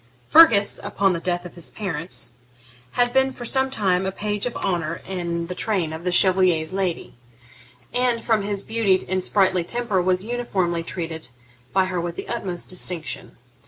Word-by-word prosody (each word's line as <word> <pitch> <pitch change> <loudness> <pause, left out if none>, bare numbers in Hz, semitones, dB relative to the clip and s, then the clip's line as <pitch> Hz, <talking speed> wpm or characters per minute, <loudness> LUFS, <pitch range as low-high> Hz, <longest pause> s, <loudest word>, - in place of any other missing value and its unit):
Fergus, 230 -11 +6
upon 195 -1 +1
the 170 - -2
death 175 0 -2
of 180 - -9
his 170 -2 -8
parents, 180 -5 -4 0.6
had 245 0 +2
been 265 0 +3
for 245 -2 -8
some 265 +2 +2
time 190 -7 +1
a - - -1
page 210 +3 -2
of 245 - -5
honour 170 -4 -2
in 170 -2 -3
the 180 - -5
train 180 -5 -1
of 160 +1 -7
the 180 - 0
Chevalier's 180 -3 +3
lady, 190 -3 -2 0.8
and, 245 -1 +1
from 225 -2 +1
his 200 0 -3
beauty 210 -5 +1
and 185 0 -1
sprightly 185 -2 +3
temper, 235 -1 -1
was 185 +2 +1
uniformly 195 -8 -1
treated 165 -4 -5 0.4
by 190 -1 +3
her 180 -2 -2
with 170 0 -4
the - - -7
utmost 190 -7 -4
distinction. 180 -2 -4
185 Hz, 170 wpm, -23 LUFS, 175-215 Hz, 0.8 s, Fergus